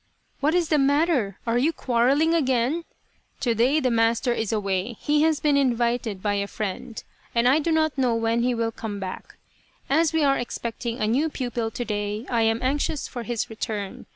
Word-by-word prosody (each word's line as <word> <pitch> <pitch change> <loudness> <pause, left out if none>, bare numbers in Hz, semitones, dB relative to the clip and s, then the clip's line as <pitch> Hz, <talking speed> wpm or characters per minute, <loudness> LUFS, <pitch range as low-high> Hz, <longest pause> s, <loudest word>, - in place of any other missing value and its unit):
" - - -42
What 305 +4 +2
is 345 -3 +1
the 305 - +3
matter? 280 - +2
Are 235 +1 +1
you 295 +6 +2
quarrelling 275 +4 +2
again? 270 +1 +1 0.6
To 240 -2 +2
day 250 +7 +3
the 255 -4 +1
master 230 +2 +2
is 225 -3 -2
away. 200 +1 -1
He 295 0 +2
has 315 -1 +3
been 295 -2 +2
invited 235 -6 0
by 205 -1 +1
a 200 0 -1
friend, 215 +3 -5 0.3
and 235 +1 +3
I 275 +5 +5
do 325 +2 -1
not 315 -1 +2
know 245 -3 +2
when 230 +1 +1
he 245 0 +1
will 230 0 -1
come 215 -2 -6
back. 190 -1 -7 0.6
As 320 +2 +3
we 320 -1 +1
are 275 -1 +3
expecting 235 0 -4
a - - +1
new 265 +9 +1
pupil 240 -5 -3
to 240 +2 -5
day 210 +1 -3
I 235 -2 +2
am 225 +1 +1
anxious 285 +2 -1
for 245 - -6
his 235 -1 -2
return. 215 -3 -5
240 Hz, 200 wpm, -24 LUFS, 225-285 Hz, 0.6 s, I